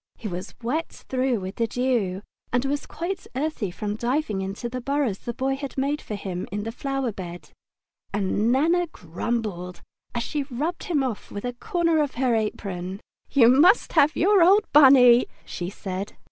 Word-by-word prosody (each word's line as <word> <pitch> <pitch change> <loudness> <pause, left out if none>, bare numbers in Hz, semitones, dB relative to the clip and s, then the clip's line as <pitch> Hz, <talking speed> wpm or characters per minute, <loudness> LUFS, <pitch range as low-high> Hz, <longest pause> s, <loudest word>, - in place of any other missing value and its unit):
He 225 - -6
was 180 -1 -6
wet 305 +8 -1
through 255 -4 -2
with 185 +1 -6
the 230 - +1
dew 225 -6 0 0.3
and 245 +2 +1 0.2
quite 355 +3 -5
earthy 275 -7 -2
from 205 +3 -4
diving 240 -3 -1
into 195 +5 -4
the 255 +1 -5
burrows 275 -6 0
the 240 - -4
Boy 270 0 0
had 275 0 -7
made 280 +3 0
for 210 - -5
him 185 -3 -5
in 205 +1 -3
the 225 - -4
flower 270 0 -2
bed, 175 -3 -8 0.6
and 205 +3 +1
Nana 335 +7 +3
grumbled 180 - -4 0.3
as 235 - 0
she 295 +3 -2
rubbed 295 +7 -3
him 300 -6 +1
off 245 -5 -4
with 205 +3 -6
a 245 - -2
corner 335 - +1
of 290 -3 -2
her 250 -1 +1
apron. 195 -4 -3 0.3
Spring 265 -5 +5
Time 235 - +7
"You 270 - +5
must 375 +8 +5
have 295 +1 +4
your 395 +2 +4
old 390 +5 +6
Bunny!" 255 -4 +8 0.2
she 175 0 -5
said. 195 0 -5
245 Hz, 180 wpm, -25 LUFS, 205-285 Hz, 0.6 s, Bunny